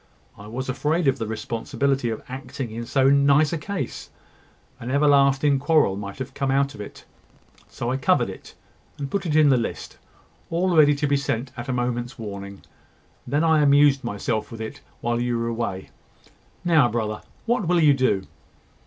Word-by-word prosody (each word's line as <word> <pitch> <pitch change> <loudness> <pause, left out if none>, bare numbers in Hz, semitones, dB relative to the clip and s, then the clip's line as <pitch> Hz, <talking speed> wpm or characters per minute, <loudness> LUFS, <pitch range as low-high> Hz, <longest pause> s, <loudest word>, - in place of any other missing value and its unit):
I 100 - -12
was 130 +4 -5
afraid 150 +5 0
of 135 -2 +2
the 115 - -3
responsibility 120 +4 -2
of 110 - -5
acting 130 -2 -6
in 115 +1 -6
so 135 +1 +3
nice 140 +2 +4
a - - 0
case. 200 +4 -5 0.7
An 120 - -6
everlasting 140 0 +3
quarrel 145 -8 +3
might 100 +2 -7
come 135 0 -2
out 140 +1 +1
of 105 - -9
it: 100 - -10 0.6
so 120 - -4
I 130 - 0
covered 135 - +2
it, - - -10 0.4
and 140 -2 -5
put 200 -2 -2
in 155 -1 +4
the 130 - +4
list, 115 - -5 0.5
all 175 +1 +1
ready 145 -2 +6
to 145 - -1
be 140 0 +2
sent 130 -2 -2
at 120 +1 -7
a - - +1
moment's 120 0 -2
warning; 100 -3 -8 0.6
and 125 - -8
then 150 - +3
I 160 -2 +4
amused 140 -1 +4
myself 110 0 -3
with 115 - -8
it 110 0 -7 0.2
while 120 0 0
you 120 -1 0
were 115 0 -2
away. 115 -5 -4 0.7
Now, 155 -8 +4
brother, 110 -2 -2 0.2
what 230 -5 0
will 175 0 +3
you 150 -3 +6
do?" 130 -8 +1
135 Hz, 180 wpm, -23 LUFS, 115-145 Hz, 0.7 s, ready